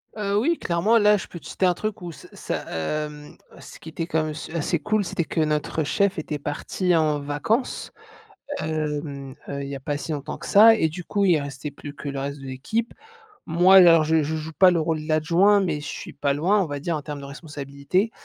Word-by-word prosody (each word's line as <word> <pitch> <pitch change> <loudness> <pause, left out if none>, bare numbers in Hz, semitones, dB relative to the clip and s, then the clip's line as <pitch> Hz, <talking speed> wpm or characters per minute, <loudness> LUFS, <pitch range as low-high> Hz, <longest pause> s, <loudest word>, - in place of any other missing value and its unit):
Heu, 200 -2 -1
oui, 330 +8 +1
clairement! 180 +7 +2
Là, 210 -1 +5
je 190 - -7
peux 170 - -9
te 145 - -19
citer 190 - -1
un 180 - +4
truc 215 +3 -4
où 175 -1 -6
c 155 - -13
ça, - - -4
hem 150 - -4 0.2
ce - - -12
qui 160 - -10
était 165 +1 -4
quand 160 -2 0
même 155 0 -3
su 155 - -8
assez 165 +1 0
cool 210 +3 0
c'était 170 -2 -2
que 160 - -1
notre 155 +1 0
chef 200 +6 +1
était 150 -2 -4
parti 180 +5 -1
en 155 -2 +2
vacances, 145 - -2 0.7
hem, 150 -3 -3
heu, 140 0 -4
il - - -5
y 140 - -4
pas 145 +2 -3
si 160 - -6
longtemps 145 -2 -4
que - - -10
ça. 225 +3 +8
Et 160 -7 +1
du 175 +3 -7
coup 200 +3 0
il 175 -5 +4
restait 140 +1 -6
plus 145 0 -9
que 145 - -9
le 140 -1 -4
reste 140 +1 -4
de 135 - -10
l'équipe. 150 - -3 0.5
Moi, 175 +4 +5
alors, 170 -3 +8
je 160 +1 +2
je 155 +2 -2
joue 155 +1 -5
pas 185 +3 +6
le 175 - +2
rôle 160 -1 -1
de 155 - -9
l'adjoint, 170 +6 +4
mais 175 -6 -1
je 145 - -7
suis - - -7
pas 140 0 0
loin, 185 +8 +2
on 185 - -1
va 145 -1 -4
dire, 165 +3 -2
en 150 - -3
termes 145 -1 -6
de 140 - -8
responsabilité. 140 +5 -2
De - - -43
155 Hz, 240 wpm, -24 LUFS, 145-180 Hz, 0.7 s, ça